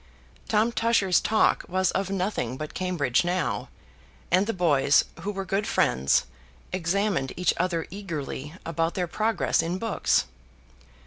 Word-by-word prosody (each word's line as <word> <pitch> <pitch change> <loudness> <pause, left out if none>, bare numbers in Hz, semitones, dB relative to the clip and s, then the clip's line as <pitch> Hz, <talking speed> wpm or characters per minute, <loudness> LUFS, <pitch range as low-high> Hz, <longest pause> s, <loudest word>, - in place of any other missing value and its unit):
Tom 220 +2 +2
Tusher's 225 -6 +2
talk 220 0 +2
was 185 0 +1
of 195 0 -1
nothing 185 - -2
but 155 +1 -6
Cambridge 175 -9 0
now; 175 0 -1 0.6
and 185 +3 +3
the - - +1
boys, 145 -7 +3
who 205 - -3
were 195 -1 -4
good 195 +3 -1
friends, 65 +3 +2 0.5
examined 185 -4 0
each 180 -1 +2
other 170 -2 0
eagerly 155 -6 -5
about 165 0 -1
their 180 - 0
progress 215 +4 +1
in 170 +3 -2
books. 225 +2 +1
180 Hz, 135 wpm, -26 LUFS, 165-200 Hz, 0.6 s, and